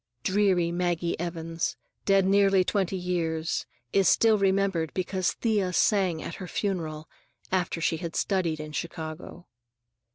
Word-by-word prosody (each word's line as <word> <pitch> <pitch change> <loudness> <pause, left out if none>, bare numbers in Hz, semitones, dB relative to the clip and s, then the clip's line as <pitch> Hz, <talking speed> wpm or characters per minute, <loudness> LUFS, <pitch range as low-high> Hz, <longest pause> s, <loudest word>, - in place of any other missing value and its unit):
Dreary 185 -3 +2
Maggie 175 -1 -1
Evans, 165 -1 -3 0.3
dead 195 -1 +4
nearly 195 -1 +4
twenty 190 -1 0
years, 165 -3 -2 0.3
is 195 -1 +4
still 225 -1 +5
remembered 195 -4 +1
because 185 0 0
Thea 205 -5 0
sang 185 -5 +2
at - - -6
her 185 - -5
funeral 160 -6 -3 0.4
"after 180 -2 0
she 165 0 +1
had 170 -1 -6
studied 175 -6 0
in 155 0 -6
Chicago." 160 +2 -6
180 Hz, 130 wpm, -27 LUFS, 165-195 Hz, 0.4 s, still